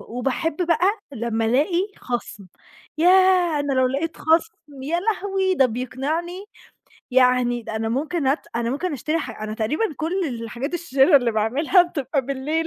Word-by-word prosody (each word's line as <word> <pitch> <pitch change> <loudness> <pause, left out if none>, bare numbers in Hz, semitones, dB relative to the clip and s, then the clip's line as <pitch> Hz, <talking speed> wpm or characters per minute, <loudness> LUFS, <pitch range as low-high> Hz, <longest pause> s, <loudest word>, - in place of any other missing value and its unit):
وباحب 265 +6 -3
بقى 335 +1 +2 0.3
لما 230 -2 -2
ألاقي 305 - +1
خَصم. 235 -5 -5 0.5
ياه 360 -3 +4
أنا 285 -1 -1
لو 260 -1 +3
لاقيت 285 +6 -2
خَصم 320 -3 -1
يا 325 +6 -1
لهوي، 385 -2 0
ده 270 -6 +4
بيقنعني 285 - -4 0.7
يعني 250 -1 +3
ده 220 - -5
أنا 225 0 -2
ممكن 295 +5 -2
أت 275 +4 0
أنا 235 0 -1
ممكن 320 +5 -2
أشتري 305 +4 -2
ح 225 -7 -7
أنا 215 0 -4
تقريبًا 235 - -1
كل 325 +3 -2 0.3
الحاجات 240 +8 -5
الشِرَا 300 -3 +4
اللي 245 -3 +2
باعملها 275 - +3
بتبقى 285 -5 -2
بالليل. 295 +4 -2
285 Hz, 150 wpm, -22 LUFS, 250-340 Hz, 0.7 s, ياه